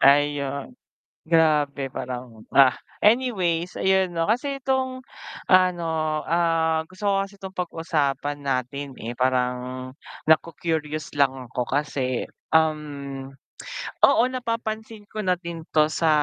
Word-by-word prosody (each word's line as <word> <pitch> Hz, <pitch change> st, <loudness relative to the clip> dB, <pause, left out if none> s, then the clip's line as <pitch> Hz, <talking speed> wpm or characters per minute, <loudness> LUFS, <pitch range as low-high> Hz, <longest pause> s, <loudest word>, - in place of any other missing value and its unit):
Hay, 145 Hz, +1 st, +5 dB
ayun. 140 Hz, -, -5 dB, 0.5 s
Grabe 150 Hz, -4 st, +3 dB
parang, 125 Hz, -4 st, -6 dB
ah! 135 Hz, -2 st, +6 dB, 0.2 s
Anyways 190 Hz, -7 st, +2 dB
ayun, 190 Hz, -1 st, +3 dB
'no, 165 Hz, -1 st, -1 dB
kasi 275 Hz, +6 st, 0 dB
itong, 260 Hz, -1 st, -1 dB, 0.4 s
ano, 180 Hz, -2 st, +4 dB, 0.4 s
ah, 165 Hz, -1 st, +2 dB
gusto 185 Hz, +2 st, -6 dB
ko 195 Hz, -1 st, +3 dB
kasi 195 Hz, 0 st, -9 dB
itong 190 Hz, -1 st, -8 dB
pag-usapan 145 Hz, -5 st, -1 dB
natin, 135 Hz, +1 st, -2 dB
eh, 115 Hz, +2 st, -5 dB
parang 125 Hz, 0 st, -1 dB, 0.4 s
naku-curious 155 Hz, -1 st, 0 dB
lang 140 Hz, -2 st, +4 dB, 0.2 s
ako 125 Hz, -, -2 dB, 0.2 s
kasi, 135 Hz, -4 st, -2 dB, 0.2 s
um, 145 Hz, -4 st, 0 dB, 0.7 s
oo, -, -, +6 dB
napapansin 225 Hz, -3 st, -4 dB
ko 215 Hz, -, -3 dB
na 185 Hz, -3 st, +1 dB
din 170 Hz, -2 st, -7 dB, 0.2 s
to 155 Hz, 0 st, +5 dB
sa 165 Hz, -, +1 dB
160 Hz, 120 wpm, -24 LUFS, 140-190 Hz, 0.7 s, ah